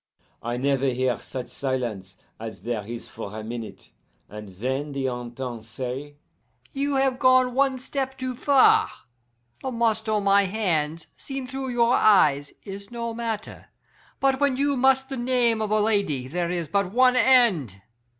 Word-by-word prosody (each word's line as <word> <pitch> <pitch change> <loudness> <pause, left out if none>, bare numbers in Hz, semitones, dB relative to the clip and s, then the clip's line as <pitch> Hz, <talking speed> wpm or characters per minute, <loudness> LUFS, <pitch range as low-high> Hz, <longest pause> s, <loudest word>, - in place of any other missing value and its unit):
"I 120 +1 -3
never 135 +1 +1
hear 130 -1 +1
such 130 -2 -7
silence 115 -8 -4 0.2
as 110 0 -8
there 115 -3 -2
is 120 0 -7
for 105 +2 -8
a 110 - -6
minute, 115 0 -8 0.4
and 105 0 -9
then 130 +9 -3
the 135 -1 -2
Intendant 120 -1 -5
say, 130 +5 -6 0.6
'You 280 0 -1
have 265 -1 +1
gone 255 -1 +4
one 270 0 +2
step 265 +1 -4
too 255 -1 -3
far. 270 +2 +4 0.7
The 265 - -3
must 225 -2 0
on 210 -1 +1
my 200 0 +4
hands, 165 -6 -1
seen 270 -1 -6
through 265 +1 -5
your 240 -1 +3
eyes, 145 -9 +4
is 200 0 -9
no 235 -1 -4
matter, 225 -2 -5 0.5
but 270 -1 +2
when 280 -3 +2
you 280 +1 +1
must 265 +1 +3
the 270 - -4
name 240 -2 +2
of 215 - -1
a 215 0 +2
lady 200 - 0
there 170 +4 -2
is 175 -2 -2
but 200 0 0
one 255 +2 +4
end. 225 - +4
200 Hz, 160 wpm, -25 LUFS, -, 0.7 s, gone